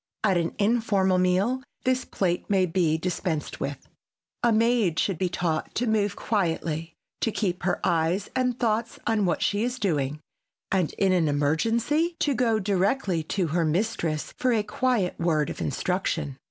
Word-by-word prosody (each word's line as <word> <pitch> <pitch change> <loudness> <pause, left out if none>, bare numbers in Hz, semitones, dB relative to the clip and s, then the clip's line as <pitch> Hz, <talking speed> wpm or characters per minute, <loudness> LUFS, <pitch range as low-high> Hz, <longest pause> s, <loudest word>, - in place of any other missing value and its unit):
At 200 -3 +3
an 170 -1 -1
informal 200 -4 +2
meal 190 +8 +2 0.2
this 255 0 +1
plate 180 -2 -1
may 190 -2 +3
be 165 -3 +1
dispensed 165 -2 -3
with. - - -5 0.5
A 240 - +3
maid 225 -6 +2
should 190 -5 0
be 185 - +1
taught 170 -2 -2
to 245 - 0
move 210 -3 +1
quietly, 165 -5 -1 0.2
to 225 - 0
keep 185 -4 -1
her 180 - 0
eyes 170 +4 +1
and 250 -1 0
thoughts 230 0 0
on 220 -3 +2
what 170 - 0
she 205 0 +1
is 245 +1 -2
doing, 150 - -1 0.5
and 185 -5 +1
in 195 -1 +2
an 175 -4 +3
emergency 225 - +1
to 290 - +1
go 235 -3 +2
directly 195 -1 +1
to 180 -1 -1
her 170 -1 +2
mistress 165 -2 -1
for 255 - +2
a 220 -3 +2
quiet 235 -5 0
word 155 -4 +1
of - - -7
instruction. 155 -2 -1
190 Hz, 165 wpm, -26 LUFS, 165-225 Hz, 0.5 s, At